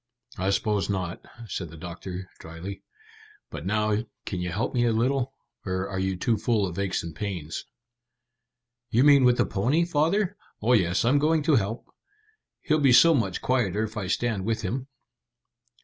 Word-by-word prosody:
"I 95 +1 +1
suppose 100 +1 0
not," 95 -3 -3 0.2
said 90 -3 -4
the 80 - -11
doctor 90 +3 -7
dryly. 80 +5 -8 0.7
"But - - -6
now, 105 +1 +1 0.2
can 95 - -3
you 90 - -2
help 100 +6 -2
me 120 - +2
a 115 - +3
little, 130 +3 0 0.3
or 95 0 -2
are 95 -1 -4
you 95 0 0
too 115 +4 +1
full 110 -1 +1
of 90 0 -5
aches 100 -1 -1
and 85 -1 -7
pains?" 90 -6 -4 1.2
"You 120 +4 +3
mean 140 -2 +7
with 125 -1 +5
the - - +3
pony, 135 - +1
father? 175 +5 +1 0.2
Oh 120 +4 +2
yes, 90 -3 +2
I'm 135 +4 +4
going 155 +1 +2
to 155 -1 +4
help. 110 +1 -1 0.8
He'll 155 -1 +1
be 135 -4 +5
so 165 +7 +8
much 120 -7 -1
quieter 110 -5 +1
if 110 0 -5
I 105 -4 -3
stand 110 0 0
with 110 +1 -1
him." 125 +7 -3
105 Hz, 175 wpm, -26 LUFS, 95-130 Hz, 1.2 s, so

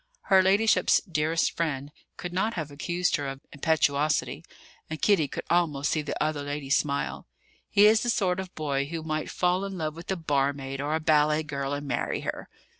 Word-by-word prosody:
Her 190 - +8
ladyship's 200 +4 +4
"dearest 165 -3 0
friend" 145 -4 -2 0.3
could 175 0 -6
not 215 +5 0
have 155 -4 -4
accused 175 +5 0
her 145 -1 -4
of 135 0 -6
impetuosity; 150 0 +1 0.5
and 155 0 -5
Kitty 195 -8 +3
could - - -6
almost 155 -5 +1
see 155 - +1
the 150 - -5
other 155 -1 0
lady 145 -1 -5
smile. 140 - 0 0.4
"He 205 - +5
is 215 +1 +6
the 240 - -1
sort 190 -5 +1
of 190 -1 -7
boy 140 -3 -1
who 160 +2 -5
might 155 -1 -3
fall 180 +1 +1
in 195 -1 -5
love 155 -2 -3
with 170 +1 -11
a 190 - +1
barmaid 140 -4 -1
or 150 +2 -1
a - - 0
ballet 155 0 +3
girl 140 -2 -4
and 145 0 -4
marry - - -1
her." - - -5
155 Hz, 190 wpm, -27 LUFS, 145-180 Hz, 0.5 s, Her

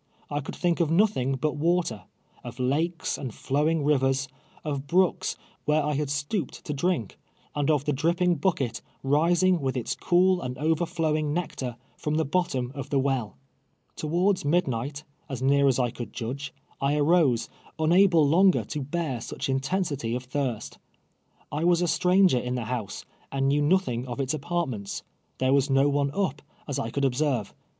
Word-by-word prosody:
I 145 - 0
could 145 - -6
thiidv 175 -1 0
of 165 -3 +2
nothing 165 - +2
but 150 +2 -2
Avater 165 - 0 0.2
— - - -32
of - - -8
lakes 155 +7 0
and 130 -4 -4
flowing 150 +7 0
rivers, 135 -2 +2 0.4
of 140 -2 -3
l)rooks 180 +3 +2 0.3
where 150 0 +2
I 150 +1 0
had 145 0 -1
stooped 145 - -3
to 150 - -2
drink, 145 - -1 0.3
and 145 0 0
of 145 -3 +2
the 150 - +1
dri])ping 170 +2 +1
bucket, 130 -11 0 0.2
rising 170 +6 +3
with 130 -1 -1
its 120 - -2
cool 180 +1 +3
and 125 0 -4
overflowing 160 -1 0
nectar, 135 -8 -3 0.2
from 150 0 -2
the 160 0 +1
bottom 140 -6 -1
of 140 -2 -6
the 140 - +1
well. 130 -5 -1 0.6
Towards 180 +5 +1
midnight, 145 -3 0 0.3
as 130 -2 -4
near 140 +1 +4
as 130 - +3
I 125 -2 +1
could 120 - -7
judge, 130 +4 -4 0.3
I 140 +1 +2
arose, 150 -5 +3 0.3
niud)Ie 175 +5 +5
longer 170 +4 +4
to 150 - -5
bear 140 -3 -2
such - - -5
intensity 135 -3 -1
of 125 0 -5
thii 130 -7 -1
st. - - -11 0.7
I 150 +2 -2
was 175 0 +3
a - - +1
stranger 180 -3 +4
in 125 +1 -3
the 125 - -2
liouse, 115 -3 -4 0.3
and 135 0 0
knew 145 +2 +2
nr)thing 145 -7 +1
of 125 +2 -5
its 135 0 0
apartments. 140 - -3 0.3
There 130 +1 +2
was 140 0 +3
no 135 +1 +4
one 140 0 +1
up, 170 -8 -1 0.3
as 140 - -2
I 115 - -2
could 140 +4 0
observe. 130 -4 0
145 Hz, 175 wpm, -26 LUFS, 130-170 Hz, 0.7 s, niud)Ie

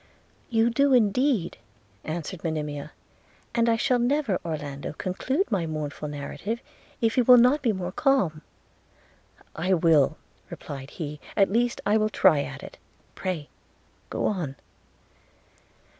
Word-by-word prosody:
'You 230 0 +3
do, 280 +3 +3
indeed,' 235 - +2 0.4
answered 165 +2 -5
Monimia; 150 -3 -3 0.6
'and 235 -1 +2
I 230 - +4
shall 245 +2 +2
never, 245 -5 +1
Orlando, 145 -4 -5
conclude 255 - -2
my 180 -6 0
mournful 150 -1 -4
narrative, 150 +10 -4 0.4
if 225 +1 +1
you 250 - +5
will 250 +1 +8
not 250 +5 +5
be 235 - +2
more 185 -3 -4
calm.' 190 - +1 1.1
'I 185 +4 +1
will,' 160 -5 +3 0.3
replied 135 -1 -8
he; 150 -2 -6 0.2
'at 195 0 +3
least 240 +1 +1
I 210 +2 +4
will 215 0 +1
try 180 -8 +4
at - - -7
it - - -11 0.2
– - - -35
Pray 175 -6 -4 0.6
go - - -2
on.' 170 -10 -2
190 Hz, 135 wpm, -26 LUFS, 155-235 Hz, 1.1 s, will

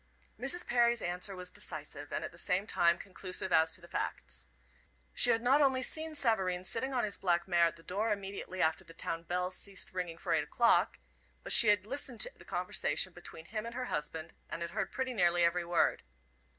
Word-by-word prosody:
Mrs. 275 +8 -1
Perry's 240 -1 +3
answer 180 +3 -2
was 180 0 -5
decisive, 145 -2 -4
and - - -2
at - - -7
the 170 - -13
same 185 +3 +1
time 170 -5 +3
conclusive 185 -1 -3
as 160 0 +5
to 185 - -2
the 170 - -13
facts. 70 - -4 0.7
She - - +2
had 225 0 +2
not 270 +4 +4
only 265 -2 +3
seen 315 +3 0
Savareen 190 -9 +1
sitting 260 +7 -1
on 250 -2 0
his 210 -1 -2
black 175 -2 +1
mare 170 -2 +4
at 165 - -5
the 165 - -14
door, 210 +6 -1
immediately 195 -2 -3
after 160 0 +1
the 165 - -14
town 165 0 -4
bell 180 +2 -2
ceased 195 0 -5
ringing 180 -3 -4
for - - -2
eight - - +2
o'clock; - - +3 0.5
but - - +1
she 235 - +10
had 205 -2 +4
listened 260 0 -3
to - - +4
the - - -16
conversation - - +1
between 160 - -8
him 215 +5 -4
and 235 0 -7
her 255 - -3
husband, 155 +2 -3 0.2
and 170 - -4
had 170 - -5
heard - - -2
pretty 260 -1 -2
nearly 175 -4 +3
every 170 +1 +2
word. 170 0 +1
185 Hz, 210 wpm, -32 LUFS, 170-230 Hz, 0.7 s, she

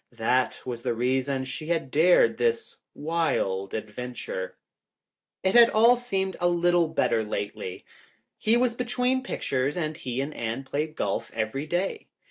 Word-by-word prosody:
That 125 +3 +1
was 120 -2 -4
the 120 - -1
reason 130 +2 0
she 155 +4 -6
had 165 -6 -1
dared 175 - +4
this 460 -1 0 0.2
wild 145 - -1
adventure. 125 - -5 0.9
It 190 0 +2
had 235 -1 +8
all 230 +3 +6
seemed 195 -6 -2
a 175 0 +3
little 175 -1 +3
better 150 -7 +1
lately. 100 -3 -5 0.5
He 225 +2 +3
was 245 -1 +2
between 250 +1 0
pictures 140 - -2
and 155 -2 -2
he 125 -5 -4
and 140 +3 -2
Anne 115 +2 -3
played 150 +3 -3
golf 100 - -2
every 115 +7 -2
day. 180 +4 -2
155 Hz, 145 wpm, -26 LUFS, 125-195 Hz, 0.9 s, had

